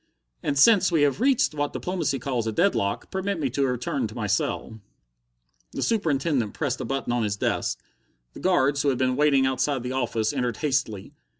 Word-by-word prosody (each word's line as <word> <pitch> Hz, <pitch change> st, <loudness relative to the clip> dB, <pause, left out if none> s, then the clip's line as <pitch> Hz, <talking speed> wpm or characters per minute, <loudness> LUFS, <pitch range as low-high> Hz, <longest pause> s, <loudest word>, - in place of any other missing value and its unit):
"And, 140 Hz, -, -1 dB
since 185 Hz, +4 st, +5 dB
we 160 Hz, -3 st, +3 dB
have 145 Hz, -, +1 dB
reached 255 Hz, -, +3 dB
what 145 Hz, -1 st, -2 dB
diplomacy 170 Hz, -6 st, -2 dB
calls 125 Hz, -3 st, -2 dB
a -, -, 0 dB
deadlock, 105 Hz, -, 0 dB
permit 190 Hz, -1 st, -2 dB
me 135 Hz, -5 st, -1 dB
to 140 Hz, +2 st, 0 dB
return 125 Hz, +1 st, -2 dB
to 110 Hz, -, -12 dB
my 115 Hz, -3 st, -3 dB
cell." 105 Hz, +2 st, -2 dB, 0.9 s
The -, -, -2 dB
Superintendent 145 Hz, -, 0 dB
pressed 140 Hz, -4 st, -2 dB
a -, -, -3 dB
button 135 Hz, -3 st, -2 dB
on 120 Hz, -, +1 dB
his 105 Hz, -2 st, -1 dB
desk; -, -, -1 dB, 0.5 s
the -, -, -10 dB
guards, 145 Hz, -6 st, +2 dB
who 145 Hz, -, +2 dB
had 130 Hz, -, 0 dB
been 130 Hz, 0 st, +1 dB
waiting 140 Hz, -2 st, +3 dB
outside 130 Hz, 0 st, 0 dB
the 125 Hz, -, -4 dB
office, 120 Hz, -3 st, -1 dB
entered 125 Hz, -4 st, -1 dB
hastily. 135 Hz, -9 st, -2 dB
135 Hz, 190 wpm, -25 LUFS, 120-150 Hz, 0.9 s, since